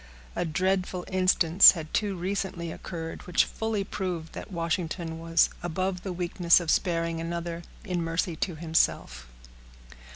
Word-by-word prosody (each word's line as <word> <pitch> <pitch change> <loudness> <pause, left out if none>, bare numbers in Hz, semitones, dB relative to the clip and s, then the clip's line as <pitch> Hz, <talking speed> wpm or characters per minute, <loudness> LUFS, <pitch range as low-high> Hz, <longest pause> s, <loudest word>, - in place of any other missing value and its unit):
A - - -1
dreadful 185 +2 -1
instance 185 -1 +6
had 160 -3 -8
too 205 -2 0
recently 180 -2 -3
occurred, 165 -1 -7
which 180 - +3
fully 220 -2 -2
proved 180 -5 -4
that - - -8
Washington 165 -1 -3
was 165 0 +2
above 180 +2 -2
the 190 - -5
weakness 175 -1 +3
of 170 -3 -1
sparing 165 -2 0
another 170 0 -4 0.2
in 180 -4 -2
mercy 165 +1 -1
to 175 0 -2
himself. 155 - 0
170 Hz, 135 wpm, -27 LUFS, 165-185 Hz, 0.2 s, instance